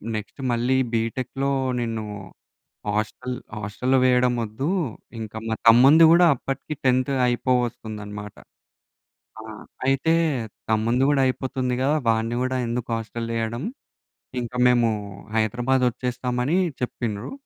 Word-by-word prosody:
Next 105 +6 -6
మళ్ళీ 120 +3 +1 0.2
బిటెక్‌లో 130 +4 -1 0.3
నిన్ను 115 -2 -3 0.9
hostel 125 +4 -3 0.2
హాస్టల్‌లో 105 +6 0
వేయడం 125 -1 +3
ఒద్దు. 115 +9 -3 0.5
ఇంకా 110 -1 -7
మా 110 - 0
తమ్ముంది 135 +8 +8
గూడా 175 +1 +6
అప్పటికి 135 +4 -5
10త్ 130 +2 +2
అయిపోవొస్తుందన్నమాట. 110 -5 -2 1.1
ఆ! - - -10 0.4
అయితే 135 +5 +2 0.6
తమ్ముంది 115 +4 +2
గూడా 140 -2 +3
అయిపోతుంది 130 -1 -2
గదా! 145 +3 +2
వాడిని 115 +1 +1
గూడా 130 0 -1
ఎందుకు 120 +1 -3
హాస్టలేయడం 115 +1 -3 0.8
ఇంకా 120 +1 -6
మేము 120 -2 +4 0.5
హైదరాబాద్ 120 +4 +1
ఒచ్చేస్తామని 125 +6 -1 0.2
చెప్పిండ్రు. 115 -3 -3
125 Hz, 105 wpm, -24 LUFS, 115-130 Hz, 1.1 s, తమ్ముంది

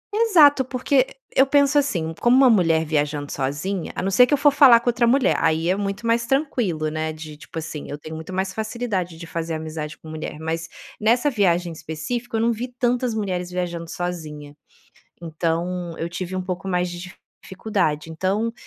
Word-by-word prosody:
Exato, 325 -12 +5
porque 260 +1 +1 0.3
e - - +1
eu 270 - +6
penso 285 +1 +4
assim: 170 - -1
como 240 +2 +5
uma 270 - +7
mulher 165 -6 +3
viajando 145 -1 -1
sozinha, 150 +7 -3
a - - -3
não 195 - 0
ser 250 +6 +6
que - - 0
eu 290 - +4
for 290 +1 +5
falar 270 -5 +7
com 240 - -13
outra 235 0 +2
mulher, 260 +2 +3
aí 160 +1 +1
é 185 - +3
muito 200 +2 -4
mais 230 0 +1
tranquilo, 230 - 0
né, 155 0 -2
de 155 -1 -9
tipo 150 - -12
assim, 155 -2 -6
eu 145 - -5
tenho 155 +2 -9
muito 160 +3 -8
mais 190 +1 -2
facilidade 215 -6 -3
de 170 - -8
fazer 165 -1 -4
amizade 155 -1 -6
com - - -15
mulher. 155 -1 -6
Mas, 165 +1 -3 0.3
nessa 240 +7 +3
viagem 175 -5 +1
em - - -7
específico, 165 +11 -5
eu - - 0
não 230 +1 +3
vi 240 +3 -4
tantas 245 -1 -1
mulheres 185 -4 -2
viajando 175 -2 -4
sozinha, 155 -5 -6 0.7
então 170 +2 -2
eu 165 - -3
tive 180 +2 -5
um 185 - -2
pouco 180 0 -5
mais 180 -1 0
de 175 +1 -8 0.3
dificuldade. 185 -7 -2
Então, 190 +8 -1
180 Hz, 195 wpm, -22 LUFS, 160-235 Hz, 0.7 s, uma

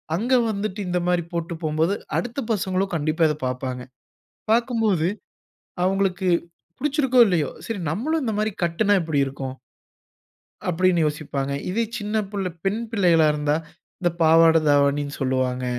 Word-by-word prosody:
அங்க 235 +9 0 0.2
வந்துட்டு 210 -1 -3
இந்த 180 0 0
மாரி 180 -1 +2
போட்டு 170 0 -3
போம்போது. 160 +4 +1 0.2
அடுத்த 240 +2 -3
பசங்களும் 190 -2 -1
கண்டிப்பா 155 +1 +1
இத 150 - -1
பாப்பாங்க. 125 0 -3 0.7
பார்க்கும்போது, 225 -8 +2 0.8
அவுங்களுக்கு 190 -1 0 0.5
புடிச்சிருக்கோ, 270 -4 +2
இல்லையோ. 165 -7 +1 0.2
சரி 225 -3 -3
நம்மளும் 310 - -1
இந்த 225 -3 -1
மாரி 215 +1 0
கட்டுனா 185 +5 +2
எப்டி 160 -3 -1
இருக்கும். 135 -1 -6 1.1
அப்டினு 180 0 +2
யோசிப்பாங்க. 145 -3 -3 0.2
இதே 230 +5 0
சின்ன 210 0 -4 0.2
புள்ள 195 -3 -2 0.2
பெண் 205 +4 0
பிள்ளைகளா 175 -8 +4
இருந்தா. 150 0 0 0.4
இந்த 175 -1 +2
பாவாட 165 0 +6
தாவணினு 145 0 +2
சொல்வாங்க. 130 -1 0
175 Hz, 130 wpm, -23 LUFS, 150-210 Hz, 1.1 s, பாவாட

